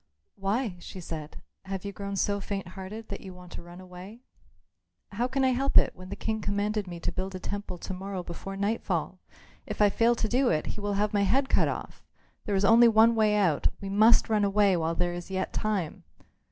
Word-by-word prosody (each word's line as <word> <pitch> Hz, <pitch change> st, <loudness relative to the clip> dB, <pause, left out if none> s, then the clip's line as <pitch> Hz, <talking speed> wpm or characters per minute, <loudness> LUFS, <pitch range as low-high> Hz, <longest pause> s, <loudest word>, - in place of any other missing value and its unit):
"Why," 200 Hz, 0 st, -1 dB
she 185 Hz, +2 st, -9 dB
said, 160 Hz, -3 st, -7 dB, 0.2 s
"have 190 Hz, 0 st, -5 dB
you 200 Hz, -, -3 dB
grown 200 Hz, 0 st, -5 dB
so 200 Hz, +1 st, +1 dB
faint 195 Hz, -2 st, -4 dB
hearted 195 Hz, +4 st, -8 dB
that -, -, -6 dB
you 190 Hz, -2 st, -9 dB
want 180 Hz, -1 st, -13 dB
to -, -, -7 dB
run 175 Hz, +1 st, -12 dB
away?" 185 Hz, +5 st, -11 dB, 0.9 s
"How 235 Hz, +5 st, 0 dB
can 265 Hz, +1 st, 0 dB
I 260 Hz, -, +4 dB
help 270 Hz, +2 st, +2 dB
it -, -, +4 dB
when 185 Hz, 0 st, -11 dB
the 200 Hz, -, -4 dB
King 220 Hz, +1 st, -2 dB
commanded 205 Hz, 0 st, -1 dB
me 175 Hz, -1 st, -7 dB
to -, -, -2 dB
build 190 Hz, +1 st, -4 dB
a -, -, -5 dB
temple 200 Hz, -1 st, -5 dB
to 190 Hz, -, -6 dB
morrow 190 Hz, 0 st, -5 dB
before 195 Hz, +3 st, -7 dB
nightfall? 205 Hz, +3 st, -1 dB, 0.5 s
If -, -, -5 dB
I 205 Hz, -1 st, +5 dB
fail 235 Hz, +4 st, +3 dB
to 225 Hz, -, -1 dB
do 250 Hz, +3 st, +2 dB
it, 155 Hz, -1 st, +1 dB
he 210 Hz, -, -8 dB
will 205 Hz, 0 st, -1 dB
have 205 Hz, +2 st, 0 dB
my 205 Hz, -, +3 dB
head 265 Hz, +7 st, +2 dB
cut -, -, +3 dB
off. -, -, -6 dB, 0.4 s
There 205 Hz, -, 0 dB
is 195 Hz, +1 st, +2 dB
only 235 Hz, +3 st, +7 dB
one 225 Hz, +1 st, +6 dB
way 215 Hz, -2 st, +3 dB
out. 180 Hz, -8 st, +2 dB
We 195 Hz, -, -6 dB
must 215 Hz, +4 st, +5 dB
run 215 Hz, -2 st, +2 dB
away 200 Hz, -1 st, +4 dB
while 165 Hz, -1 st, 0 dB
there 175 Hz, 0 st, 0 dB
is 175 Hz, +1 st, -7 dB
yet 190 Hz, 0 st, -2 dB
time." 200 Hz, -7 st, -2 dB
200 Hz, 220 wpm, -28 LUFS, 185-215 Hz, 0.9 s, only